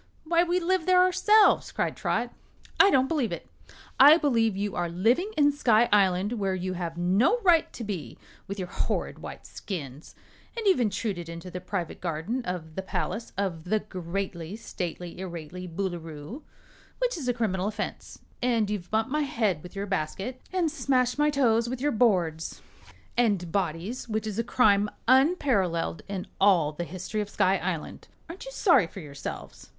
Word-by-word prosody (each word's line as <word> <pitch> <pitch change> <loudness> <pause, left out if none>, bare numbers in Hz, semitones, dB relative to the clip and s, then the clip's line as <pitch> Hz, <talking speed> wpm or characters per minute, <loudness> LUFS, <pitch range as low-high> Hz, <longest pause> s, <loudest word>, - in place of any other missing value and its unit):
"Why, 335 +1 +3
we 355 +1 +1
live 360 -1 0
there 365 0 +6
ourselves," 420 +4 +4
cried - - -1
Trot. - - -1 0.5
"I 395 - +8
don't 265 -6 +3
believe 275 -7 0
it. - - -6 0.5
I 290 +4 +9
believe 230 - +1
you 205 -1 -2
are 175 -1 -1
living 235 - +1
in 290 -1 +5
Sky 240 -5 +3
Island, 195 +1 +3
where 195 -2 0
you 185 0 -3
have 170 -2 -4
no 195 - +3
right 345 -5 +4
to 240 - -6
be, 200 -6 -5 0.3
with 200 - -5
your 185 -2 -4
horrid - - -2
white - - -9
skins. 150 -7 -7 0.4
And 455 - -3
you've 380 -8 +4
intruded 200 -5 -2
into 170 +2 -8
the 180 - -6
private 180 -2 -4
garden 180 +9 -2
of 170 -3 -5
the 190 - -3
palace 220 +4 -3
of 180 -5 -2
the 215 +4 +2
Greatly 180 -1 -5
Stately 180 -6 -6
Irately 180 0 -7
Boolooroo, 170 - -5 0.6
which - - 0
is 295 -7 -5
a - - +4
criminal 200 -5 -1
offense; 215 - -5 0.2
and 230 -4 +1
you've 190 -4 -4
bumped 220 +3 0
my 305 +1 +1
head 220 - 0
with 180 +4 -12
your 200 +1 -3
basket 195 +7 -3
and 355 -4 +1
smashed 260 -4 +1
my 295 0 +4
toes 235 -5 +2
with 255 0 -4
your 290 +3 +1
boards 180 -9 +1 0.5
and 200 -8 +1
bodies, 195 +6 -2
which 220 0 -1
is 215 0 -3
a - - +2
crime 210 -4 +3 0.2
unparalleled 255 - +2
in 195 -2 -4 0.2
all 180 -7 +4
the 170 +3 -5
history 185 +5 -4
of 205 - -5
Sky 190 -1 +2
Island! 175 -4 -4 0.2
Aren't 335 +7 -9
you - - -7
sorry 335 - +4
for 190 - -10
yourselves?" 145 -4 -8
205 Hz, 175 wpm, -27 LUFS, 180-255 Hz, 0.6 s, I